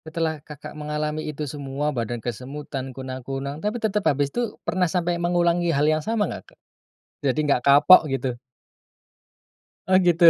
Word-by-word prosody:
Setelah 160 -1 -2
Kakak 150 -1 -10
mengalami 150 +1 -3
itu 150 0 -4
semua, 145 +1 -3
badan 120 0 -2
kesemutan, 130 +4 -5
kunang-kunang 135 +3 -5
tapi 210 +3 -1
tetap 210 -2 0
habis 140 -1 0
itu 240 -3 -2
pernah 180 -2 +1
sampai 175 0 0
mengulangi 175 0 +2
hal 145 -2 +2
yang 155 0 +2
sama 220 +4 0
nggak - - -8
Kak? - - -61 0.7
Jadi 135 +2 +1
nggak 125 - +3
kapok 145 +5 +8
gitu? 135 -4 -2 1.5
Oh, 185 0 +5
gitu. 175 -2 +3
150 Hz, 150 wpm, -24 LUFS, 135-175 Hz, 1.5 s, kapok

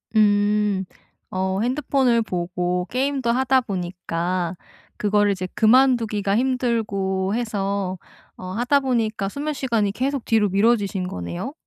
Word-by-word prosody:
음, 205 -2 +3 0.4
어 190 +1 -1
핸드폰을 255 -2 +2
보고 180 -2 -2
게임도 265 -1 -1
하다 260 +1 +3
보니까 180 -3 -3 0.4
그거를 205 0 +2
이제 185 -1 -3
그만 255 +3 +5
두기가 210 -3 -1
힘들고 215 -7 0
해서 200 -5 -2 0.4
어 185 - -8
하다 245 +7 +2
보니까 225 -6 -1
수면 295 +7 -3
시간이 230 -7 0
계속 265 +4 -2
뒤로 215 -3 +2
미뤄지신 200 -2 +1
거네요? 85 - -5
210 Hz, 275 characters per minute, -22 LUFS, 190-245 Hz, 0.4 s, 그만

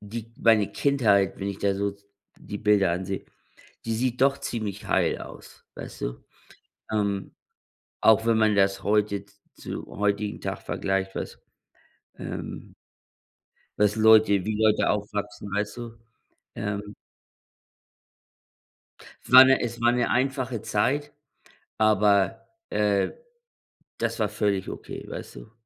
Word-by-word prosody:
die 115 +2 -8
meine 110 -3 +4
Kindheit, 105 -9 +2
wenn 100 - -2
ich 100 - -5
da 100 -1 +1
so 100 0 -2 0.4
die 105 - -7
Bilder 105 -4 +3
ansehe, 95 +2 -4 0.6
die 115 -1 -1
sieht 125 +1 -1
doch 140 0 +4
ziemlich 110 -7 -5
heil - - +1
aus, - - -13
weißt - - -9
du? - - -5 0.7
Ähm, 100 -2 -1 0.7
auch 110 0 +5
wenn 115 -1 +3
man 110 -1 +3
das 95 -1 +2
heute 100 -1 +1
z 100 0 -26 0.2
zu - - -7
heutigen 105 0 -2
Tag - - -4
vergleicht, 95 0 -2
was, - - -6 0.8
ähm - - -7 1.0
was 105 0 +3
Leute 110 -3 +5
wie 110 +2 -2
Leute 110 -1 +3
aufwachsen, 105 0 -3
weißt 105 +2 -2
du? 120 -1 -6 0.6
Ähm. 105 0 -4 2.3
War 130 +1 +10
'ne 135 0 +5
es 120 0 -4
war 120 0 +4
'ne 120 -1 0
einfache 130 -2 -1
Zeit, 145 +8 -1 0.7
aber, 105 -1 +3 0.2
äh, 105 -2 +1 0.9
das - - -2
war - - +1
völlig 100 -3 -1
okay, - - -8
weißt - - -8
du? - - -12
105 Hz, 125 wpm, -26 LUFS, 100-115 Hz, 2.3 s, War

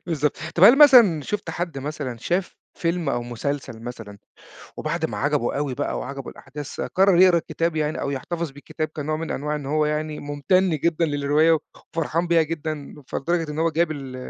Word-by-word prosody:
بالضبط. 150 -3 0 0.2
طب 175 - +6
هل 250 +7 +8
مثلًا 235 - +7
شُفت 210 +8 -4
حد 170 -5 -4
مثلًا 140 -3 -5
شاف 175 +8 -2 0.2
فيلم 170 -2 -1
أو 120 - 0
مسلسل 120 0 -4
مثلًا 115 -4 -8 0.6
وبعد - - -2
ما - - -5
عجبه 120 - 0
أوي 140 -2 -1
بقى - - -2
وعجبه 135 0 -6
الأحداث، 145 +1 -8
قرّر 190 -1 +3
يقرا 185 -2 +6
الكتاب 165 0 -2
يعني 155 0 -1
أو 140 - -2
يحتفظ 165 +3 -4
بالكتاب 145 +3 -5
كنوع 155 0 -3
من 160 +1 -4
أنواع 150 +2 -2
إن 145 -2 -6
هو 150 +2 +1
يعني 150 0 -2
مُمتَن 165 +7 +1
جدًا 170 0 +2
للرواية 150 +2 +3 0.2
خ - - -17
وفرحان 165 +2 0
بيها 170 -1 +4
جدًا، 155 -2 -4
فلدرجة 165 +1 -1
إن 150 - -4
هو 165 - +2
جاب 165 +1 +1
ال 135 -4 -6
155 Hz, 185 wpm, -23 LUFS, 140-170 Hz, 0.6 s, هل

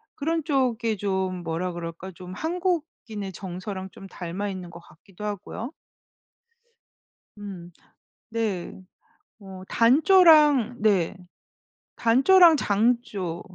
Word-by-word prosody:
그런 320 +2 -1
쪽이 245 -7 0
좀 190 -2 -2
뭐라 170 +2 -3
그럴까 170 +2 -7
좀 180 +1 -10
한국인의 320 - -3
정서랑 190 +1 -6
좀 195 - -12
닮아 185 +3 -5
있는 185 -2 -7
것 170 0 -11
같기도 180 +4 -15
하고요. 210 +4 -5 1.7
음. 190 -4 -9 0.6
네. 215 -6 -3 0.6
어 190 -2 -11
단조랑 295 - +5
네. 195 -4 +2 0.8
단조랑 320 +8 +6
장조 205 -6 -1
205 Hz, 185 characters per minute, -25 LUFS, 185-255 Hz, 1.7 s, 단조랑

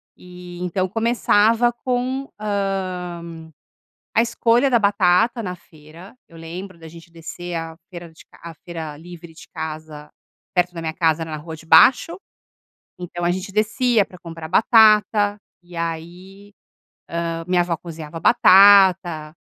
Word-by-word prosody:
E 180 -1 -12
então 180 +1 -2
começava 230 +2 +2
com, 255 +2 -3
hã, 185 -5 -4 0.7
a 225 - +4
escolha 235 +2 +1
da 245 - +3
batata 205 +2 +2
na 180 -4 -5
feira. 165 +2 -16
Eu 165 - -16
lembro 175 +3 -9
da 165 -1 -13
gente 165 +1 -14
descer 170 +1 -8
a 165 0 -5
feira 175 -3 -10
de 160 - -18
ca - - -22
a 170 -1 -8
feira 160 -2 -8
livre 170 +1 -13
de 160 - -15
casa, 155 -2 -8 0.4
perto 180 -1 0
da 165 - -6
minha 160 -1 -4
casa, 165 -1 0
na 155 -1 -6
rua 160 +2 -9
de 160 - -16
baixo. 255 - +4 0.8
Então 175 -1 -6
a 175 - +1
gente 185 +2 -4
descia 220 +2 +1
pra 180 - -16
comprar 165 -2 -9
batata, 210 0 +4 0.3
e 175 0 -14
aí, 175 +5 -7 0.7
hã, 165 0 -4
minha 180 -1 +2
avó 175 -1 -2
cozinhava 165 -1 -9
batata. 190 -6 +5
180 Hz, 145 wpm, -20 LUFS, 165-205 Hz, 0.8 s, batata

